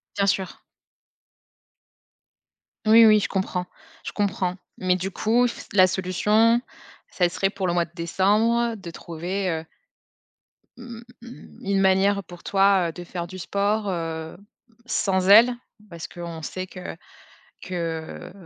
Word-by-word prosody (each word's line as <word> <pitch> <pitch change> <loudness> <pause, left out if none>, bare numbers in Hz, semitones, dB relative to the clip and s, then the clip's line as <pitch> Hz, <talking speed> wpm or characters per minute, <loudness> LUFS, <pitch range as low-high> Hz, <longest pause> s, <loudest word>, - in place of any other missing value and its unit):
Bien 200 -1 +1
sûr. 190 -1 -2 2.2
Oui, 225 +1 +8
oui, 215 -1 +6
je - - -2
comprends. 190 -2 -2 0.4
Je - - -5
comprends. 190 -3 -1 0.2
Mais 185 -1 +1
du 190 +2 -3
coup, 235 +5 +2
f - - -8
la 185 -2 +6
solution, 210 +5 +2 0.5
ça 175 -2 +1
serait 195 +2 0
pour 195 -1 -4
le 175 - 0
mois 170 -1 +1
de 165 - -25
décembre, 215 +7 +1
de 175 -5 -9
trouver, 180 +4 -4
heu, 160 -1 -3 1.1
mmh, 240 -2 -10 0.6
une 195 0 0
manière 195 +1 +3
pour 175 0 -13
toi, 195 -2 +3
heu, 165 - -5
de 175 +1 -9
faire 170 -1 -6
du 185 - -9
sport, 200 +3 -1
heu, 165 -3 -4 0.5
sans 190 -5 0
elle. 235 +4 +8 0.3
Parce 170 -3 -8
qu'on 170 -2 -8
sait 185 +4 -5
que 185 -2 -8 0.7
que 165 -3 -5
190 Hz, 135 wpm, -24 LUFS, 175-205 Hz, 2.2 s, Oui